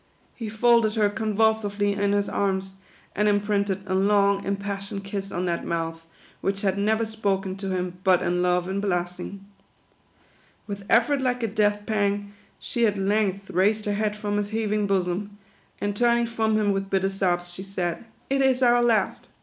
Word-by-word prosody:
He 225 -3 -6
folded 225 0 +3
her 210 -2 +2
convulsively 210 -1 +1
in 200 0 0
his 205 0 +1
arms, 190 -1 -1 0.4
and 210 +1 +2
imprinted 205 -1 0
a 190 - -3
long, 200 +1 +3
impassioned 200 0 -4
kiss 195 0 -5
on 180 +1 -2
that 170 -1 -1
mouth, 165 -1 -3 0.3
which 195 +1 -1
had 190 -2 +2
never 215 +3 +1
spoken 200 -3 -2
to 195 0 -4
him 180 -1 -3
but 185 -1 +4
in 180 +1 0
love 180 0 +1
and 195 +1 -2
blessing. 180 +1 -3 1.2
With 200 -1 -6
effort 255 +5 +3
like 250 -2 0
a - - +2
death 205 -1 +1
pang, 205 -1 -1 0.3
she 235 -1 +1
at 205 -1 -1
length 195 0 0
raised 210 +4 +2
her 205 - 0
head 210 0 -1
from 205 -1 -2
his 205 0 -1
heaving 215 -1 0
bosom, 195 +1 -1 0.4
and 205 0 -2
turning 235 +1 +3
from 225 -2 0
him 210 -1 +2
with 195 0 -2
bitter 195 -1 +1
sobs, 175 -2 -1
she 185 - -7
said, 185 -2 -3 0.2
"It 275 0 +1
is 265 -1 +3
our 240 0 +5
last. 235 -3 +1
200 Hz, 175 wpm, -25 LUFS, 195-215 Hz, 1.2 s, our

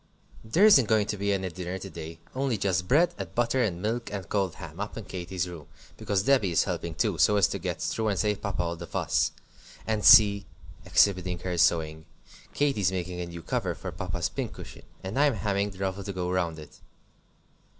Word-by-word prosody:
There 160 - +3
isn't 135 - +7
going 110 -2 +3
to 105 - -3
be 100 0 -1
any 95 -1 -1
dinner 90 +1 -5
today, 85 -4 -8 0.2
only 130 -3 -1
just 90 -2 0
bread 160 - +3
and 95 -1 -7
butter, 120 +2 +1
and 95 -6 -1
milk, 115 +2 -2
and 100 -4 -5
cold 95 -2 -1
ham, 80 +2 -10
up 105 +3 -5
in 115 - -5
Katy's 90 0 -4
room, 85 -5 -9 0.3
because 95 -2 -1
Debby 130 -6 +3
is 85 - +3
helping - - -4
too, - - 0
so 105 - +4
as 100 - +4
to - - -4
get - - -4
through 110 -1 -1
and 100 -2 0
save 105 -1 0
Papa 100 -4 -2
all 85 0 -3
the 85 +1 -9
fuss. - - 0 0.5
And 110 -2 -1
see," 105 -5 +7 0.4
exhibiting 90 -3 +3
her 90 -1 -3
sewing, 80 -2 +1 0.5
"Katy's 130 -11 +1
making 90 -1 -4
a 90 - -4
new 85 -1 -9
cover - - -2
for - - -7
Papa's - - -3
pincushion, - - -7 0.2
and 95 +8 -3
I'm 145 -4 +4
hemming 100 0 -1
the 95 - -13
ruffle 95 +1 -3
to 100 - -4
go 90 -1 -3
round 85 -3 -1
it." 75 -1 -13
95 Hz, 200 wpm, -27 LUFS, 90-105 Hz, 0.5 s, isn't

